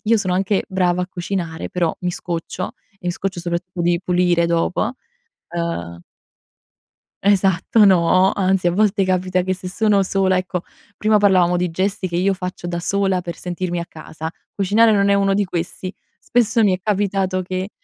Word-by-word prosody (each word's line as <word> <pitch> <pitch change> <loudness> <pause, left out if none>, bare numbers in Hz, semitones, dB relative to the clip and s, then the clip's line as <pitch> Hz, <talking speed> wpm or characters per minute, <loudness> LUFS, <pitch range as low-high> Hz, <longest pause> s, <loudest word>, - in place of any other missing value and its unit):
io 225 +1 +4
sono 185 -3 -1
anche 195 +1 +1
brava 180 -2 +1
a - - -3
cucinare, 175 -3 -4
però 175 -3 -1
mi 180 0 -1
scoccio 175 +1 -4 0.3
e 180 - -9
mi - - +2
scoccio 185 0 -4
soprattutto 175 +1 -3
di 170 0 +2
pulire 175 -2 +2
dopo. 170 +7 0 0.6
Uhm 85 - -3 1.3
Esatto, 200 +2 +4
no! 185 +1 +4
Anzi, 190 -2 +1
a - - +4
volte 205 0 +2
capita 185 0 +1
che 185 +1 -1
se 185 0 -9
sono 205 +1 +2
sola 190 0 +1
ecco, 180 -1 -2 0.4
prima 215 0 +3
parlavamo 185 -4 +4
di 180 -1 -1
gesti 190 +2 -1
che 170 -1 -3
io 195 +2 +2
faccio 180 -1 -6
da 175 0 -3
sola 195 -1 0
per 170 -1 -5
sentirmi 175 0 -3
a 170 - -5
casa, 160 0 -7 0.2
cucinare 215 +3 +4
non 200 -1 +3
è 200 - +4
uno 195 0 +2
di 200 +1 +2
questi; 180 +1 -4 0.3
spesso 235 -1 +2
mi 195 -3 +4
è 185 - -21
capitato 195 -2 0
che 185 +2 -4
185 Hz, 175 wpm, -20 LUFS, 175-195 Hz, 1.3 s, io